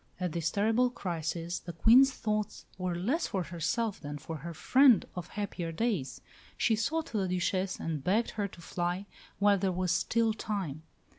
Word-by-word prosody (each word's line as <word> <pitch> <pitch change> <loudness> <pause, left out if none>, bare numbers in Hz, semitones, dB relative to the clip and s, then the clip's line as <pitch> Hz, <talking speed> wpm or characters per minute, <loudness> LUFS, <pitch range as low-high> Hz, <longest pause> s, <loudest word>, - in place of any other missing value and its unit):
At 180 -2 -1
this 165 0 -1
terrible 225 +5 +2
crisis 170 -4 -3
the 175 - -8
Queen's 245 - +6
thoughts 215 -4 -2
were 180 -1 -1
less 240 - 0
for 190 -4 -1
herself 175 +7 -2
than 145 -1 -5
for 160 +2 -6
her 170 +4 -7
friend 255 - +5
of 180 -1 -5
happier 195 -5 -4
days. 185 - -2 0.4
She 225 - +3
sought 310 +10 -1
the 200 -4 0
Duchesse 185 +1 -1
and 155 -4 -3
begged 210 +8 +1
her 205 -2 -2
to 175 - -14
fly 175 +3 -2 0.3
while 200 -1 +4
there 190 0 +1
was 180 -1 0
still 225 +5 +2
time. 195 -9 -4
185 Hz, 170 wpm, -31 LUFS, 170-220 Hz, 0.4 s, Queen's